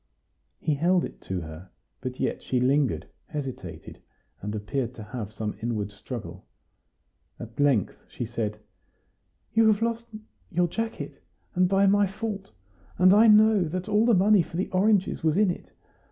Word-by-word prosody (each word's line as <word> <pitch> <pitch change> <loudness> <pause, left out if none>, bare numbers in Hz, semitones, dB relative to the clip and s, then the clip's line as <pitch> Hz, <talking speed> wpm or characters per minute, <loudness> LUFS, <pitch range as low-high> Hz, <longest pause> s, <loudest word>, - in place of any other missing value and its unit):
He 155 - 0
held 175 +5 +2
it - - -10
to 95 -1 -3
her, 80 +3 -9 0.3
but 130 0 -5
yet - - -1
she 125 - 0
lingered, 125 - +2 0.2
hesitated, 140 -5 -7 0.4
and 105 +2 -4
appeared 120 +4 -3
to 110 - -8
have 105 -1 -6
some 110 -1 -4
inward 110 -3 -2
struggle. 100 -4 -8 1.0
At 115 +2 -10
length 140 -8 +2
she 120 - -5
said: 110 -2 -3 1.0
"You 225 0 +5
have 210 +1 0
lost 230 0 -2 0.4
your 175 -1 +2
jacket, 225 +6 -5 0.3
and 180 -1 +3
by 195 +1 +4
my 200 +1 +4
fault; 200 0 -5 0.5
and 185 +1 +6
I 220 +3 +7
know 215 -2 +6
that 180 +5 -4
all 215 +2 +3
the 235 - +5
money 200 +1 +5
for 165 - -6
the 185 - -1
oranges 195 0 +2
was 160 +1 +2
in 205 -3 +4
it. - - -9
165 Hz, 160 wpm, -26 LUFS, -, 1.0 s, I